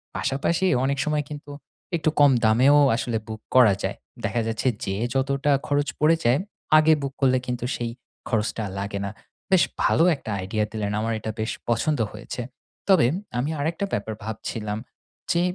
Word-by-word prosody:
পাশাপাশি 165 +7 0 0.2
অনেক 140 +1 0
সময় 150 -1 0
কিন্তু 145 -1 -8 0.4
একটু 160 -2 +1
কম 145 -1 +7
দামেও 125 +6 +5 0.2
আসলে 120 -1 -1
বুক 110 0 -7
করা 120 -6 +7
যায়। - - -2 0.3
দেখা 120 - 0
যাচ্ছে, 115 +3 -1 0.2
যেয়ে 100 +4 -1
যতটা 140 +2 +1 0.2
খরচ 145 0 +1
পড়ে 155 +2 +5
যায়, 120 +4 +4 0.4
আগে 155 +1 +6
বুক 140 -1 -3
করলে 130 -1 +4
কিন্তু 125 -1 -2
সেই 120 -1 -3 0.4
খরচটা 110 -1 0 0.2
লাগে 100 0 -3
না। 100 - -4 0.4
বেশ 190 -2 +6 0.2
ভালো 165 - +4
একটা 135 -5 -10
আইডিয়া 105 +3 -1
দিলেন, 105 -2 -2
আমার 115 +1 -1
এটা 110 - -4
বেশ 110 +1 -1 0.2
পছন্দ 145 +5 +1
হয়েছে। 115 +3 -6 0.5
তবে, 190 -11 +6 0.3
আমি 135 +5 -1
আরেকটা 165 +6 -1
ব্যাপার 110 +2 -2
ভাবছিলাম, 105 -1 -4 0.5
যে 170 - +2
125 Hz, 160 wpm, -24 LUFS, 110-145 Hz, 0.5 s, কম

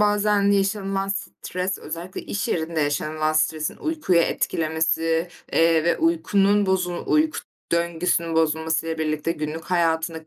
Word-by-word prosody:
bazen 205 -1 +3
yaşanılan 195 -1 0
stres, 190 -1 -3
özellikle 170 +4 -7
iş 200 - -3
yerinde 160 -1 -1
yaşanılan 155 +1 0
stresin 155 0 0
uykuyu 310 - 0
etkilemesi, 160 0 0 0.2
eee, 165 -1 +4
ve 170 -1 +2
uykunun, 195 +5 +2
bozu 180 -2 -1
uyku 310 0 +2 0.3
döngüsünün 170 0 0
bozulmasıyla 160 0 0
birlikte 155 +1 -1
günlük 155 +1 -5
hayatındaki 165 -2 0
165 Hz, 115 wpm, -23 LUFS, 160-195 Hz, 0.3 s, eee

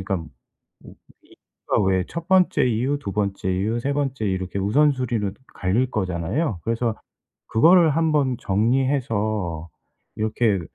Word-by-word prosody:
그러니까 95 0 -2
뭐 80 -2 -8 1.0
이 - - -20 0.3
그니까 - - +2
왜 95 -1 +1
1 170 +4 -7
번째 185 -1 +4
이유, 125 +5 0
2 115 -9 -6
번째 100 -2 -2
이유, 110 +6 -1
3 140 +3 -1
번째 135 -6 -2
이유 95 - +1
이렇게 95 +1 -4
우선순위로 120 -1 +1 0.2
갈릴 120 +8 0
거잖아요. 95 - -2
그래서 115 0 -1 0.5
그거를 165 +7 +5
한번 150 -5 +1
정리해서 110 - 0 0.5
이렇게 110 -2 +1
110 Hz, 285 characters per minute, -23 LUFS, 95-135 Hz, 1.0 s, 그거를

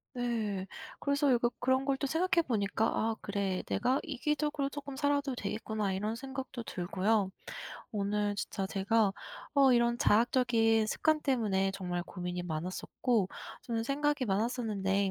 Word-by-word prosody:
네. 220 -6 -1 0.3
그래서 280 -1 +2
약간 240 0 +3
그런 260 +1 +2
걸 275 -1 +1
또 280 - -2
생각해 335 +3 +2
보니까 215 -1 +1
'아 225 0 0
그래. 200 -2 -1
내가 255 +3 +1
이기적으로 295 0 -1
쪼끔 280 -1 -7
살아도 285 -1 +1
되겠구나.' 210 -2 -2
이런 210 +4 -1
생각도 265 0 -6
들고요. 190 +1 0 0.6
오늘 205 0 0
진짜 195 -1 -3
제가 200 +1 +2 0.4
어 270 -2 +6
이런 235 0 +3
자학적인 225 -1 +3
습관 310 +7 +2
때문에 205 -8 +1
정말 180 -2 -3
고민이 180 -1 -4
많았었고 185 +6 -1 0.3
저는 230 -1 -2
생각이 290 +1 0
많았었는데 200 -3 0
225 Hz, 320 characters per minute, -32 LUFS, 200-265 Hz, 0.6 s, 어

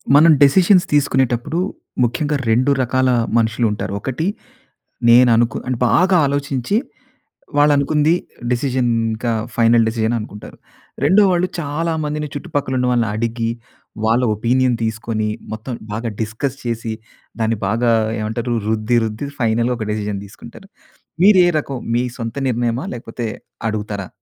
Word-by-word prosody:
మనం 160 +3 +7
డెసిషన్స్ 180 +6 +5
తీసుకునేటప్పుడు 135 +1 +1 0.4
ముఖ్యంగా 145 +5 0
2 125 +5 +3
రకాల 130 +1 +1 0.3
మనుషులుంటారు. 110 -3 0
ఒకటి 135 +8 -3 0.8
నేను 120 +1 +7
అనుకు 120 +1 +1
అంటే 125 -2 -2
బాగా 185 +1 +4
ఆలోచించి 140 - -1 0.8
వాళ్ళు 145 0 +5
అనుకుంది 150 +3 +2 0.4
డెసిషన్. 125 -1 0 0.2
ఇంకా 115 +2 -2 0.2
ఫైనల్ 115 0 +4
డెసిషన్ 110 +1 0
అనుకుంటారు. 105 -1 -10 0.5
రెండో 190 +8 +5
వాళ్ళు 180 +1 +1
చాలామందిని 150 -1 -2
చుట్టుపక్కల 145 -4 -3
ఉన్న 125 0 +1
వాళ్ళని 120 -3 +1
అడిగి, 115 +1 -1 0.6
వాళ్ళ 115 +3 +3
ఒపీనియన్ 125 +3 +1
తీసుకొని, 110 -1 -2 0.2
మొత్తం 110 +4 -5 0.2
బాగా 115 +3 -3
డిస్కస్ 115 +5 -3
చేసి, 115 -2 -3 0.5
దాన్ని 110 0 +1
బాగా 115 +3 +1 0.3
ఏమంటారు? 110 +3 -2
రుద్ది 110 +2 +1
రుద్ది 110 +6 -4
ఫైనల్‌గా 115 +2 +1
ఒక 110 -2 -4
డెసిషన్ 105 -2 -3
తీసుకుంటారు. 120 - -13 0.5
మీరు 200 -1 +7
ఏ - - +4
రకం? 140 -2 -5 0.2
మీ 120 - +2
సొంత 115 -2 -5
నిర్ణయమా? 120 +1 -1
లేకపోతే 115 0 -6 0.4
అడుగుతారా? 105 -3 -4
120 Hz, 125 wpm, -19 LUFS, 110-140 Hz, 0.8 s, మనం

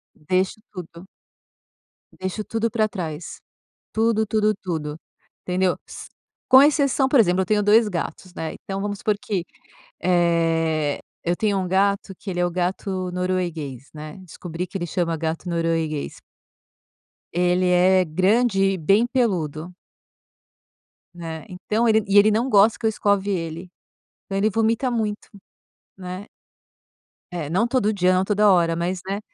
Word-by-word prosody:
Deixo 185 +7 -1
tudo 175 -1 -9 1.1
deixo 190 +3 -4
tudo 225 +1 -2
pra 220 -2 +2
trás, 165 -6 -6 0.5
tudo, 220 0 +1
tudo, 215 0 +2
tudo, 155 -5 -4 0.5
entendeu? 180 0 0
Sss - - -10 0.4
com 260 +1 +9
exceção 280 -2 +3
por 275 - +6
exemplo 185 -3 +3
eu - - -1
tenho 210 +2 +2
2 215 +2 +5
gatos, 180 0 -5
né, 160 -3 -4
então 195 0 -6
vamos 205 0 -3
supor 215 0 +1
que, 195 -6 -2 0.6
eh, 165 -4 +1 0.2
eu 175 +1 0
tenho 205 -1 +1
1 185 -1 -2
gato 195 +1 +1
que 200 - -6
ele 175 -1 -2
é - - +3
o - - -2
gato 185 +1 -2
norueguês, 170 -8 -3
né, 155 +4 -9
descobri 175 0 -6
que 185 - -8
ele 175 - -3
chama 170 0 -1
gato 160 +2 -3
norueguês. 165 -3 -1 1.2
Ele 180 +1 +2
é 180 +1 +4
grande 195 +6 +2
e 195 -1 +2
bem 195 +7 +3
peludo. 180 - -1 1.4
Né, 165 -2 -7
então 210 +6 -1
ele 220 -1 +4
e 200 +1 +3
ele 205 +1 +7
não 230 +5 +1
gosta 210 0 +5
que 235 - -4
eu - - +5
escove 205 -2 0
ele, 170 0 -4 0.5
então 195 - -3
ele 205 +2 +2
vomita 225 +4 +1
muito, 215 -3 -3 0.7
né. 185 +1 -7 1.1
Eh, 165 -5 -4
não 190 +8 +1
todo 240 -4 +1
dia, 185 -2 +2
não 185 +1 +2
toda 210 +1 +3
hora, 170 -3 +4
mas, 175 +2 -2
né, 195 +1 -3
185 Hz, 150 wpm, -23 LUFS, 170-210 Hz, 1.4 s, com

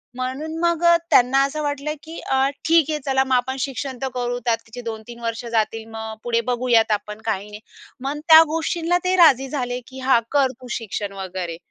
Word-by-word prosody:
म्हणून 260 +5 -4
मग 340 0 +1
अ, 340 0 +7 0.2
त्यांना 255 +2 +5
असं 305 +2 -4
वाटलं, 290 +1 -2
की 325 +1 -9
अ, 265 +1 +1 0.2
"ठीक 325 -2 +4
आहे 305 - -1
चला 265 -1 +2
मग 265 -1 -2
आपण 260 +1 0
शिक्षण 265 0 -4
तर 265 - -1
करू 245 0 -2
त्या 235 -1 +3
तिचे 235 +2 -9
2-3 230 +1 -7
वर्ष 230 +1 -4
जातील 225 0 0
मग 220 0 -6
पुढे 235 -1 +1
बघूयात 240 -2 +2
आपण 210 +1 -3
काही 210 -2 -2
नाही." 210 - -9 0.5
मग 290 +2 -2
त्या 320 0 +11
गोष्टींना 335 +1 0
ते 370 +1 +2
राजी 270 -6 +5
झाले, 250 -3 -3
की 265 0 -10
"हां, 260 -2 +3
कर 275 -3 +3
तू 250 - -10
शिक्षण 205 -2 -5
वगैरे." 185 -3 -5
255 Hz, 200 wpm, -22 LUFS, 225-285 Hz, 0.5 s, त्या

